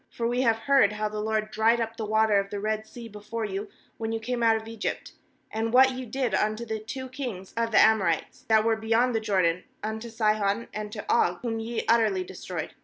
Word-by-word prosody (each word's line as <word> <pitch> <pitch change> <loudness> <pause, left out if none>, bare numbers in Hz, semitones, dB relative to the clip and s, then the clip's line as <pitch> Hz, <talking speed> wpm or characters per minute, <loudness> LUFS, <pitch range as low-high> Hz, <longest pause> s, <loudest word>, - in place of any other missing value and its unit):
10For 230 - 0
we 245 +2 0
have 230 -3 +3
heard 265 -4 +3
how 215 0 -2
the 215 0 -5
LORD 215 0 -1
dried 225 +2 +3
up 225 0 -2
the 220 -2 -4
water 220 -1 +3
of 195 0 -3
the 205 - -4
Red 215 +1 -2
Sea 235 -1 -9
before 215 +1 -5
you, 200 +1 -4 0.3
when 225 0 -2
ye 225 - -1
came 240 +2 -3
out 225 -1 +5
of 220 0 -5
Egypt; 225 -2 -4 0.4
and 225 +1 -1
what 260 +2 +6
ye 255 -1 -6
did 250 -1 -1
unto 215 +3 0
the 220 -1 -3
two 260 +5 -6
kings 245 -8 -6
of 230 0 0
the 220 - +2
Amorites, 190 -8 +2
that 220 -1 +4
were 225 -1 +3
beyond 225 +3 +1
the 225 - +1
Jordan, 185 -5 +1 0.2
unto 220 +2 -4
Sihon 215 -1 0
and 210 0 -5
to 210 -1 -6
Og, 175 -6 +2
whom 225 -2 -2
ye 225 +1 -3
utterly 220 -5 +3
destroyed. 180 -2 -6
220 Hz, 225 wpm, -27 LUFS, 210-230 Hz, 0.4 s, what